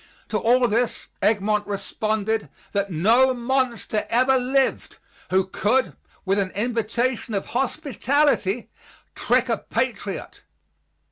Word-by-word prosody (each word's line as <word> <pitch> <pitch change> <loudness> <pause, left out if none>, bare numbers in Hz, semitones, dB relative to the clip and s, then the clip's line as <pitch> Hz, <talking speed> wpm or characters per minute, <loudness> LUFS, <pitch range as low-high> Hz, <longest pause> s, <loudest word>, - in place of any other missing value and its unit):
To - - 0
all 245 +2 +3
this 235 +2 -1
Egmont 210 0 +1
responded 215 +1 -2 0.2
that 200 -1 -1
no 230 +10 +4
monster 240 -3 -1
ever 255 +3 +3
lived 260 +1 0 0.3
who 185 0 +2
could, 210 +7 0 0.3
with 195 +1 +2
an 195 -1 0
invitation 235 +1 -1
of 195 - -1
hospitality, 270 - 0 0.4
trick - - +1
a - - 0
patriot. - - -3
230 Hz, 110 wpm, -23 LUFS, 205-255 Hz, 0.4 s, no